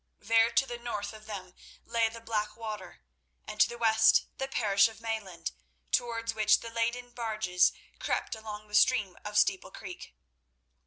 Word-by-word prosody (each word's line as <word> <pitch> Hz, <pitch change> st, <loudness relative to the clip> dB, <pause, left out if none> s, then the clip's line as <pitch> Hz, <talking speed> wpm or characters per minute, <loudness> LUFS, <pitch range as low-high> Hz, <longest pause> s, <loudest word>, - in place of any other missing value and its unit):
There 225 Hz, +2 st, +3 dB
to 270 Hz, -, +3 dB
the 240 Hz, -2 st, -6 dB
north 210 Hz, -4 st, -4 dB
of 215 Hz, 0 st, -13 dB
them 185 Hz, -4 st, -7 dB, 0.3 s
lay 230 Hz, -1 st, +1 dB
the 230 Hz, +1 st, -9 dB
Blackwater, 215 Hz, -, -4 dB, 0.4 s
and 215 Hz, -, -8 dB
to -, -, +6 dB
the 240 Hz, -, -7 dB
west 220 Hz, -1 st, +5 dB
the 270 Hz, -, -1 dB
parish 200 Hz, -6 st, +3 dB
of 225 Hz, -1 st, -11 dB
Mayland, 200 Hz, -8 st, -4 dB, 0.4 s
towards 230 Hz, -1 st, 0 dB
which 215 Hz, -1 st, +4 dB
the 230 Hz, -, -7 dB
laden 235 Hz, +2 st, -2 dB
barges 215 Hz, -6 st, +1 dB, 0.3 s
crept -, -, -1 dB
along 215 Hz, -1 st, -7 dB
the 210 Hz, -, -19 dB
stream 210 Hz, -4 st, +4 dB
of 210 Hz, 0 st, -3 dB
Steeple 195 Hz, -2 st, +2 dB
Creek. 180 Hz, -, -10 dB
220 Hz, 160 wpm, -30 LUFS, 210-230 Hz, 0.4 s, to